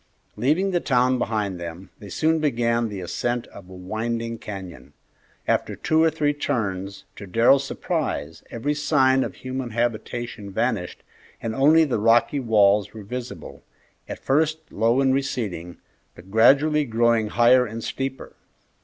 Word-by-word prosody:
Leaving 155 - +1
the 175 - +1
town 125 -3 +2
behind 105 -6 -2
them, 85 +2 -8
they 100 - -10
soon 160 +6 +1
began 115 -5 0
the 100 -2 -6
ascent 120 +7 -2
of 95 -2 -13
a 95 - -11
winding 115 +5 -4
canyon. 95 -5 -9 0.5
After - - 0
two 160 0 +1
or 165 - +5
three 150 -2 0
turns, 100 -9 -3
to 100 - -9
Darrell's 120 +8 +4
surprise, 80 - -3
every 140 +6 -2
sign 135 -3 +2
of - - -6
human 130 -1 -5
habitation 120 -1 -3
vanished 110 -3 -2 0.4
and 115 - -4
only 150 +6 +5
the 135 -8 -1
rocky 115 +6 +3
walls 105 -4 +3
were 110 - -8
visible, 125 +4 -7 0.5
at - - -5
first 155 +2 0
low 115 +5 +2
and 135 -1 +3
receding, 105 -11 -3 0.4
but 95 +3 -15
gradually 140 +7 +4
growing 115 -3 +2
higher 120 +3 +4
and 115 +1 -7
steeper. 135 0 -5
120 Hz, 145 wpm, -23 LUFS, 105-135 Hz, 0.5 s, or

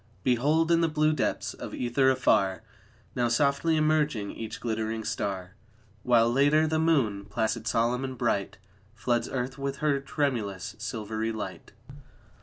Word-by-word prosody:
Behold, 150 +7 +2
in 170 0 +4
the 165 - +3
blue 155 0 +2
depths 150 - -1
of - - -7
ether 130 +2 +2
afar, 105 -7 +2 0.5
Now 120 -1 +1
softly 140 +6 +2
emerging 150 -9 +1
each 110 -1 -7
glittering 110 -1 -2
star; 95 -4 -3 0.5
While, 115 0 +4
later, 145 +4 +4
the 155 0 0
moon, 130 -12 +1
placid, 110 0 -2
solemn 120 +4 +1
and 130 -1 -5
bright, 105 -4 -1 0.4
Floods 120 +1 0
earth 130 +1 -3
with 140 0 -3
her 145 -2 +1
tremulous, 115 - -2
silvery 110 -1 -3
light. 110 -1 -7
125 Hz, 140 wpm, -28 LUFS, 110-145 Hz, 0.5 s, in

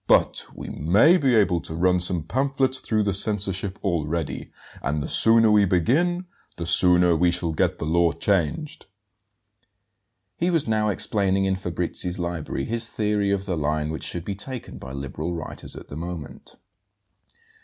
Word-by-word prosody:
But - - +3
we - - -8
may 105 - +4
be 135 -7 +2
able 100 -5 +3
to 80 - -3
run 90 +2 +2
some 90 -2 +1
pamphlets 135 - 0
through 110 -1 0
the 100 -1 0
censorship 100 -1 0
already; 85 -4 -2 0.3
and 75 +2 -2
the - - -4
sooner 115 -1 +5
we 105 -1 +5
begin 150 - +1 0.3
the 85 - -4
sooner 90 0 +5
we 90 +2 +3
shall 85 -1 0
get - - 0
the - - -4
law 85 +1 +2
changed." 90 - -2 1.5
He 175 - 0
was 165 -7 +1
now 110 -1 +1
explaining 95 -1 +2
in 95 0 +1
Fabrizi's 90 0 -3
library 85 -6 -4
his 115 0 0
theory 105 -2 -1
of 100 -1 -1
the 95 -2 -2
line 75 0 -1
which 80 - -6
should 85 -1 -3
be 100 - -3
taken 120 +5 -7
by 65 - -9
liberal 70 +5 -5
writers 80 - -7
at - - -11
the - - -8
moment. 85 -3 -8
90 Hz, 165 wpm, -24 LUFS, 85-110 Hz, 1.5 s, sooner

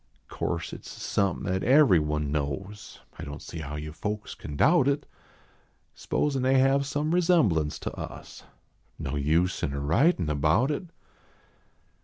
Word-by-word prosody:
Course - - -3
at - - -7
s - - -14
somepin 100 -4 -1
at 95 - -1
everyone 80 - +4
knows; 75 +8 -4 0.2
1 - - -7
don 70 0 -6
t - - -13
see 85 - -7
how 75 -1 -6
you 75 0 -6
folks 105 +5 -4
can 75 - -8
doubt 160 - +4
it; 140 +1 0 0.9
S - - -15
posin 140 -3 0
they 130 +1 +3
have 135 +1 +3
some 150 +3 -1
resemblance 115 - +2
to - - -5
us. - - -9 0.5
No 65 - -4
use 80 +6 +1
in 70 - -1
a 70 - -3
writin 85 - +2
about 80 - +2
it. 150 +5 -3
95 Hz, 160 wpm, -27 LUFS, -, 0.9 s, everyone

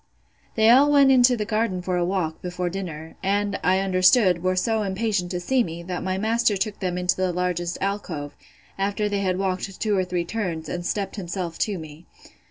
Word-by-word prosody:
They 220 0 +5
all 280 +4 +6
went 280 -2 +6
into 250 -1 +5
the 210 - -2
garden 215 -3 0
for 180 0 -1
a 175 - +1
walk, 175 -3 -2
before 180 0 -3
dinner; 165 -4 -6
and, 200 +1 0
I 185 +1 +3
understood, 185 0 +4
were 185 +1 +1
so 220 +4 +1
impatient 200 -2 -1
to 180 -1 -3
see 250 +7 +1
me, 170 -3 -6
that 180 0 -4
my 185 0 -2
master 220 0 +1
took 205 +1 -3
them 180 -2 -2
into 180 0 +1
the 185 -1 0
largest 175 -1 -2
alcove, 185 -7 -3 0.4
after 200 +2 0
they 205 -1 -1
had 185 -2 0
walked 190 0 -3
two 210 -2 +1
or 190 - +2
three 180 -1 -2
turns, 175 -6 -3
and 175 0 -4
stept 195 +3 -3
himself 175 -2 -4
to 205 -3 0
me. 160 0 -11
185 Hz, 200 wpm, -24 LUFS, 180-210 Hz, 0.4 s, all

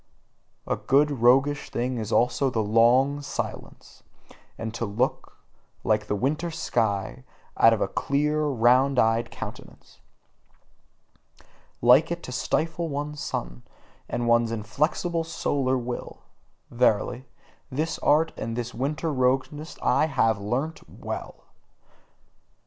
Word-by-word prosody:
A - - 0
good 145 +2 +3
roguish 135 +4 +3
thing 125 0 -2
is 110 0 -5
also 125 +3 +2
the 115 -3 -1
long 120 +7 +3
silence, 145 - -7 0.6
and 110 0 -5
to 115 - -4
look, 115 +5 -2 0.5
like 105 -1 +1
the 105 - 0
winter 150 - -1
sky, 115 - -2 0.3
out 115 - +6
of 115 - 0
a - - +2
clear, 150 +8 0
round 130 +1 +3
eyed 115 0 +2
countenance: - - -10 1.8
Like 125 +8 +6
it 170 0 -4
to - - -7
stifle 160 +6 -1
one's 145 +1 -4
sun, - - -4 0.5
and 120 0 -2
one's 120 -1 +3
inflexible 155 +10 -1
solar 140 -5 -1
will: 120 0 -6 0.5
verily, 120 +1 +1 0.4
this 155 +4 -2
art 160 +2 +3
and 115 0 -4
this 120 0 -4
winter 150 +5 -2
roguishness 135 +4 -1
have 155 -3 +1 0.2
I - - -10
learnt 130 +10 -2
WELL! - - -7
130 Hz, 120 wpm, -25 LUFS, 115-150 Hz, 1.8 s, out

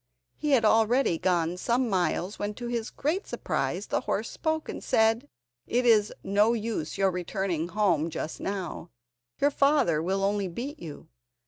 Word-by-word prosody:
He 300 - -3
had 235 -4 +4
already 225 -4 +3
gone 175 -1 +1
some 240 +6 +1
miles 185 0 -1
when, 205 0 -3
to 240 - -7
his 235 -1 -2
great 330 +8 -2
surprise, - - -2
the - - -1
horse - - -2
spoke, 315 -1 -2
and - - -6
said: 225 +5 +2 0.4
"It 245 +2 +1
is 215 -3 +5
no 205 +4 +3
use 215 -9 -3
your 195 -1 +3
returning 180 -2 -2
home 175 -5 +1
just 160 - -5
now, 190 -3 -4 0.5
your 285 +1 +3
father 275 - +3
will 190 +3 -1
only 200 0 +1
beat 260 - -6
you. 160 0 -9
205 Hz, 160 wpm, -27 LUFS, 180-240 Hz, 0.5 s, is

